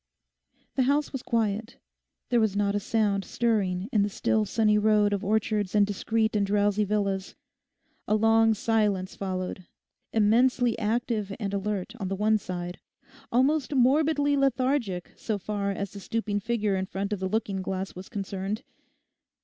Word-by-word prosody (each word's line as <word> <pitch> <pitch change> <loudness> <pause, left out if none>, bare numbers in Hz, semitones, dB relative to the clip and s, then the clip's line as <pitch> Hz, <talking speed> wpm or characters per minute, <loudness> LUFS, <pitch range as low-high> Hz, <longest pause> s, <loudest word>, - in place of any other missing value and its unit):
The - - +4
house 290 +1 +1
was 270 - -3
quiet. 225 -1 -1 0.5
There 240 -2 +3
was 215 -3 +1
not 200 -1 +1
a 205 - +1
sound 205 -2 0
stirring 200 -6 0
in 210 - +4
the 205 - +1
still 215 +2 +1
sunny 210 0 +2
road 210 -1 +3
of 200 - -2
orchards 210 -1 0
and 205 -1 +5
discreet 220 +2 0
and 205 - +2
drowsy 205 +1 +2
villas. 195 -2 -1 0.7
A 210 - +3
long 225 +1 +4
silence 205 -4 0
followed, 185 -1 -4 0.4
immensely 235 +2 +3
active 220 -1 -1
and 200 -3 -3
alert 200 0 -2
on 195 - -3
the 195 - -2
one 215 +2 +2
side, 180 -2 -5 0.5
almost 275 +3 +2
morbidly 285 +3 +3
lethargic 255 -8 0
so 215 -2 -2
far 200 0 -3
as 200 0 -3
the 200 - -9
stooping 210 0 -2
figure 210 -2 0
in 190 0 -2
front 200 +2 -3
of 205 - -3
the 190 0 -2
looking 200 -2 -1
glass 190 0 -4
was 185 +1 -10
concerned. 200 +2 -4
210 Hz, 155 wpm, -27 LUFS, 195-225 Hz, 0.7 s, and